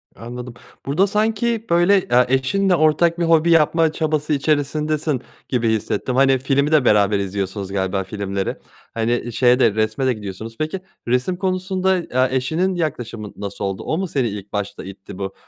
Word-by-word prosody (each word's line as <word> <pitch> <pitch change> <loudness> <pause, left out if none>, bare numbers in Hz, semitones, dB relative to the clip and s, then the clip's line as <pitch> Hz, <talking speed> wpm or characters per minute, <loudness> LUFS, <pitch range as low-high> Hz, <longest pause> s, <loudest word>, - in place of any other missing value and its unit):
Anladım. 120 +1 -8 0.3
Burada 170 +9 +2
sanki 220 +2 0
böyle, 175 +4 +4
eee, 125 -3 +3
eşinle 180 +9 +2
ortak 165 +2 +3
bir - - +1
hobi 165 0 +4
yapma 165 0 +4
çabası 155 -1 -1
içerisindesin 150 0 0 0.3
gibi 120 -3 +1
hissettim, 110 +3 -1
hani, 135 0 +4
filmi 140 +3 +1
de 150 -5 +4
beraber 105 -1 +4
izliyorsunuz 100 0 -3
galiba 95 0 -1
filmleri. 100 -1 -3 0.4
Hani, 120 +1 -1
şeye 125 +1 +4
de 110 - +4
resme 110 +4 0
de 130 - +3
gidiyorsunuz. 110 +2 -7
Peki, 155 +5 -2 0.3
resim 125 +9 0
konusunda, 190 0 0
eee, 130 -6 0
eşinin 170 +8 0
yaklaşımı 120 -10 -4
nasıl 100 -1 -5
oldu? 95 -1 -3
O 155 - -1
mu 190 0 -2
seni 130 -7 0
ilk 100 0 -8
başta 105 -1 -4
itti 95 -1 -10
bu, 95 -1 -4
130 Hz, 165 wpm, -20 LUFS, 110-165 Hz, 0.4 s, böyle